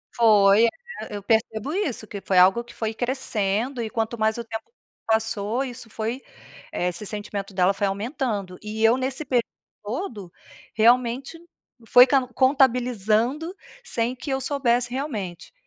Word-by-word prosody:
Foi, 210 -2 +6
eh, - - +4 0.4
eu 205 -1 -6
percebo 220 +5 0
isso, 290 - -2
que 200 -1 -7
foi 190 - 0
algo 190 +6 +6
que 240 - -15
foi 220 -1 -3
crescendo 240 -1 -1
e, 225 - -3
quanto 225 0 -2
mais 220 0 +1
o 235 - -4
tempo 225 - -7 0.3
passou, 220 +2 0
isso 245 -3 -8
foi, 225 +4 -4 0.5
eh, 175 - -1
esse 180 +4 -5
sentimento 205 -1 -5
dela 185 +1 +3
foi 200 +1 0
aumentando. 205 - -3
E 215 +1 -4
eu, 225 +2 +5
nesse 260 +3 -2
período 245 -5 +1 0.4
todo, 210 - -5 0.4
realmente 245 +6 +2 0.5
foi 245 +2 +8
can 265 -1 +2
contabilizando 250 - +2 0.3
sem 235 - -1
que 260 - -8
eu 265 - -1
soubesse, 250 -3 +1
realmente. 220 - -5
230 Hz, 150 wpm, -24 LUFS, 210-255 Hz, 0.5 s, foi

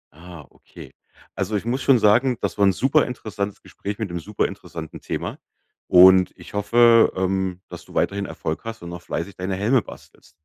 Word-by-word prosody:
Ah, 85 -3 -12
okay. - - -15 0.4
Also, 110 - -2
ich 105 - -2
muss 125 +3 -1
schon 135 -3 +4
sagen, 115 +4 +3
das - - -3
war 100 - +5
'n 95 - +5
super 140 - +2
interessantes 105 -5 -5
Gespräch 100 0 -7
mit 110 -5 -4
'nem 85 - -4
super 105 +5 -2
interessanten 80 -2 -9
Thema. - - -5 0.5
Und 95 +1 +7
ich - - -14
hoffe, 115 +3 +4
ähm, 95 -1 -1
dass - - -10
du - - -16
weiterhin 100 0 0
Erfolg 80 -2 -5
hast 115 -5 -8
und 85 - -7
noch 85 0 -8
fleißig 85 +3 -5
deine 95 +1 -3
Helme 110 +6 +2
bastelst. - - -15
100 Hz, 190 wpm, -22 LUFS, 90-115 Hz, 0.5 s, Und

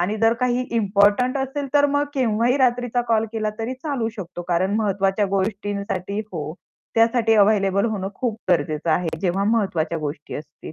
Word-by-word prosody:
आणि 200 +5 0
जर 225 +1 +4
काही 250 0 +1
इम्पोर्टंट 210 +3 +3
असेल 275 +1 -2
तर 290 0 +6
मग 285 0 +1
केव्हाही 240 0 +2
रात्रीचा 245 -1 +2
कॉल 225 -1 +3
केला 215 -1 -1
तरी 230 +3 -3
चालू 260 -4 -2
शकतो, 175 -2 -6
कारण 185 +4 +1
महत्वाच्या 200 -1 +1
गोष्टींसाठी 200 -1 -2
हो. 155 -3 -4 0.4
त्यासाठी 230 0 +3
अव्हेलेबल 200 -1 +3
होणं 200 -4 -2
खूप 235 -2 -2
गरजेचं 155 -1 +1
आहे, 170 +2 +1
जेव्हा 190 +1 0
महत्वाच्या 190 -7 0
गोष्टी 150 0 -5
असतील. 150 +1 -10
210 Hz, 155 wpm, -22 LUFS, 190-240 Hz, 0.4 s, तर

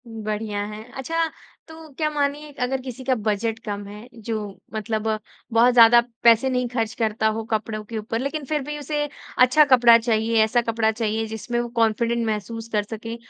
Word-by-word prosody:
बढ़िया 215 -2 -4
है। 210 +1 -8
अच्छा, 330 +5 -1 0.4
तो 320 0 -12
क्या 310 -1 +1
मानिए 295 0 -2
अगर 260 +1 -1
किसी 255 0 -8
का 260 0 +2
बजट 220 +1 -1
कम 205 -1 -4
है 210 +3 -10
जो 225 -1 -4 0.4
मतलब 220 0 -2 0.5
बहुत 240 +2 +5
ज़्यादा 235 0 +8 0.2
पैसे 235 +2 +5
नहीं 250 -1 0
ख़र्च 225 -2 -2
करता 220 -1 +1
हो 225 - -3
कपड़ों 215 0 -2
के 225 +1 -6
ऊपर 220 +1 -3
लेकिन 280 +3 -3
फिर 300 +2 -1
भी 295 +2 -5
उसे 295 +1 -2 0.3
अच्छा 255 +5 +6
कपड़ा 240 -4 +7
चाहिए, 225 -1 +2
ऐसा 230 +2 +2
कपड़ा 230 -1 +1
चाहिए 220 0 -2
जिसमें 220 +2 -3
वो 240 - -2
कॉन्फिडेंट 230 +1 +1
महसूस 220 +1 -4
कर 210 -1 +2
सके, 225 +2 -7
230 Hz, 180 wpm, -23 LUFS, 220-255 Hz, 0.5 s, ज़्यादा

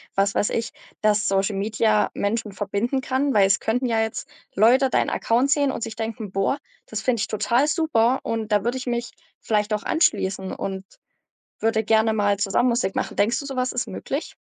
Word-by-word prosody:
was 200 0 +2
weiß 205 - +1
ich, 230 - -2 0.3
dass 210 -1 +2
Social 195 +1 +1
Media 215 +1 +1
Menschen 215 +1 -1
verbinden 205 +7 -2
kann? 270 +2 0
Weil 195 -2 +6
es 195 +1 +3
könnten 245 +3 -1
ja 225 -2 +1
jetzt 220 0 -3 0.3
Leute 250 +6 +5
deinen - - +1
Account 250 +5 +1
sehen 285 -2 +3
und - - -5
sich 225 -1 -5
denken: 220 -3 -5
„Boah, 195 +8 0 0.3
das 215 -1 -4
finde 245 -4 +1
ich - - -1
total 240 +6 +1
super, 265 -6 +2
und 225 -1 -3
da 205 - +3
würde 245 +2 0
ich 255 - -8
mich 240 0 -2 0.3
vielleicht 210 -1 0
auch 210 - -5
anschließen 190 - 0
und 190 0 -5 0.7
würde 220 0 +1
gerne 220 0 +3
mal 205 -2 +1
zusammen 210 +5 +2
Musik 235 -5 0
machen.“ - - -3
Denkst 230 +4 +2
du, 280 - -7
so 270 -1 -5
was 255 0 0
ist 250 -1 -2
möglich? 270 - -5
225 Hz, 200 wpm, -23 LUFS, 205-250 Hz, 0.7 s, Weil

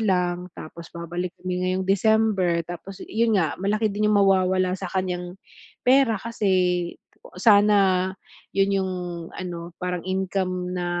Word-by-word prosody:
lang, 180 -3 0
tapos 170 +2 -9
babalik 175 +1 -4
kami 180 0 -3
ngayong 185 +1 0
December. 195 -4 +2
Tapos, 175 +3 -9
yun 225 -1 +1
nga, 160 -5 +1
malaki 210 +2 +1
din 210 +1 +1
yung 210 - +4
mawawala 185 -1 +3
sa 190 - -5
kanyang 180 -1 -3 0.5
pera 255 -3 +4
kasi 185 -6 0 0.5
sana 200 -3 +5 0.4
yun 195 0 +2
yung 190 0 -2 0.4
ano, 170 -1 -6
parang 180 -1 -2
income 185 -1 -1
na, 180 -1 -2
185 Hz, 130 wpm, -24 LUFS, 180-200 Hz, 0.5 s, sana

